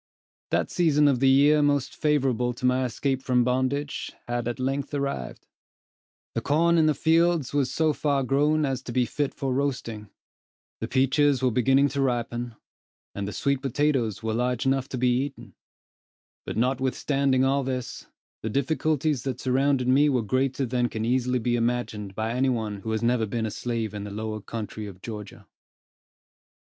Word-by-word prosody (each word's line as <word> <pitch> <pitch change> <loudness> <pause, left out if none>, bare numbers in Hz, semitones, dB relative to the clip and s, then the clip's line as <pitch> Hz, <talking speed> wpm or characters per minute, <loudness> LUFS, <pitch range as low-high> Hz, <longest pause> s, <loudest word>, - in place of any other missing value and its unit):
That - - 0
season 150 -4 +3
of 135 -4 +2
the 135 0 +4
year 145 +3 +5
most 145 -2 +1
favorable 130 -5 +1
to 125 +1 -5
my 130 +1 +2
escape 130 +2 -1
from 125 -2 +2
bondage, 130 +3 -1 0.2
had 120 -1 -2
at 120 +1 -3
length 135 +3 -2
arrived. 140 -1 -4 0.9
The - - -1
corn 170 +3 +3
in 155 - +4
the 155 - +2
fields 165 -2 +2
was 140 -3 +1
so 155 -1 +2
far 140 -2 0
grown 150 +4 +2
as 135 -2 -2
to 125 - -7
be 125 +1 +2
fit 140 +5 -2
for 135 -2 -2
roasting; 125 -6 -3 0.7
the - - -3
peaches 135 +1 +2
were 130 - +3
beginning 135 +4 +3
to 140 - -2
ripen, 120 -2 -2 0.6
and 100 0 -4
the - - -4
sweet 140 +4 0
potatoes 130 -6 0
were 110 0 -1
large 125 +1 -1
enough 135 0 +1
to 130 - -4
be 125 0 +2
eaten; 140 0 -8 0.9
but - - -4
notwithstanding 130 +2 +1
all 135 +1 +2
this; 130 -2 -4 0.3
the 110 - -3
difficulties 150 +2 0
that 130 -1 -4
surrounded 130 0 +1
me 140 +3 +4
were 125 -4 +1
greater 130 +4 0
than 120 0 0
can 110 0 -3
easily 125 +1 +1
be 120 0 0
imagined 115 -4 -2
by 110 +2 -2
any 130 +2 +2
one 110 -4 -2
who 110 - -6
has 110 0 -1
never 115 -2 +2
been 115 +2 -2
a 110 - -3
slave 115 -3 -3
in 105 -1 -5
the 105 - -6
lower 110 +1 -4
country 110 -1 -6
of 95 -2 -11
Georgia. 105 0 -8
130 Hz, 175 wpm, -26 LUFS, 120-140 Hz, 0.9 s, year